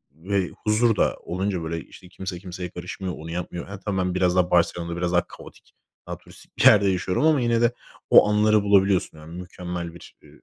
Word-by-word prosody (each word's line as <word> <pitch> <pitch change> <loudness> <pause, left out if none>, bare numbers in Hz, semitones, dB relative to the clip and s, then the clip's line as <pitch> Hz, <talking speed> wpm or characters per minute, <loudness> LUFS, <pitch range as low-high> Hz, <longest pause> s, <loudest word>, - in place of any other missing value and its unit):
ımm, 80 +5 -16
ve 100 -3 +1
huzur 110 +1 +1
da - - +1
olunca 90 0 -2
böyle 80 +1 -3
işte 90 - -15
kimse 95 -1 -6
kimseye 90 -1 -7
karışmıyor, 90 +1 -6
onu 80 +1 -8
yapmıyor. 90 0 -5
Ha, 100 0 -8
tam 100 0 -3
ben 90 -1 -1
biraz 90 -1 +2
daha 90 -1 +2
Barcelona'da 85 0 +1
biraz 90 0 -1
daha 90 0 +1
kaotik, - - -15 0.3
daha - - -5
turistik - - -17
bir - - 0
yerde 100 -1 +7
yaşıyorum 95 - 0
ama 155 -4 +3
yine 120 -1 +1
de 120 0 +4 0.4
o - - +7
anları 105 0 +3
bulabiliyorsun. 100 -4 +2
Yani, 80 +3 -9
mükemmel 90 -1 -6
bir, 85 - -14
eee, - - -19
90 Hz, 205 wpm, -24 LUFS, 85-100 Hz, 0.4 s, yerde